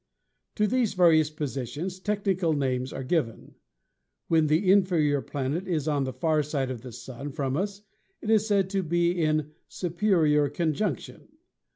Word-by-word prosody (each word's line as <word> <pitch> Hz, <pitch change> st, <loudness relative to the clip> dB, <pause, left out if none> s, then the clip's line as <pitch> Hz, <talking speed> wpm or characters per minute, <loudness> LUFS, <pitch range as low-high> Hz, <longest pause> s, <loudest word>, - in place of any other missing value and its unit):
"To 210 Hz, -, +2 dB
these 230 Hz, -2 st, +1 dB
various 160 Hz, -4 st, +5 dB
positions 150 Hz, +4 st, -4 dB
technical 195 Hz, -4 st, 0 dB
names 130 Hz, -3 st, -1 dB
are 135 Hz, -, -5 dB
given. 130 Hz, -5 st, -2 dB, 0.8 s
When 160 Hz, -2 st, +3 dB
the 170 Hz, +5 st, +3 dB
inferior 170 Hz, -8 st, +3 dB
planet 145 Hz, +8 st, -3 dB
is 160 Hz, -5 st, -1 dB
on 145 Hz, -3 st, +1 dB
the 130 Hz, -, -3 dB
far 155 Hz, +4 st, +1 dB
side 140 Hz, -3 st, -2 dB
of 120 Hz, -3 st, -6 dB
the 125 Hz, 0 st, -9 dB
Sun 130 Hz, +5 st, -8 dB
from 135 Hz, -2 st, -2 dB
us 200 Hz, +4 st, -3 dB, 0.4 s
it 220 Hz, -, -2 dB
is 220 Hz, -1 st, +3 dB
said 200 Hz, -3 st, +2 dB
to 195 Hz, -1 st, +1 dB
be 170 Hz, 0 st, +1 dB
in 155 Hz, -3 st, 0 dB, 0.2 s
'Superior 170 Hz, -5 st, +1 dB
Conjunction.' 160 Hz, -, -2 dB
160 Hz, 155 wpm, -27 LUFS, 140-185 Hz, 0.8 s, various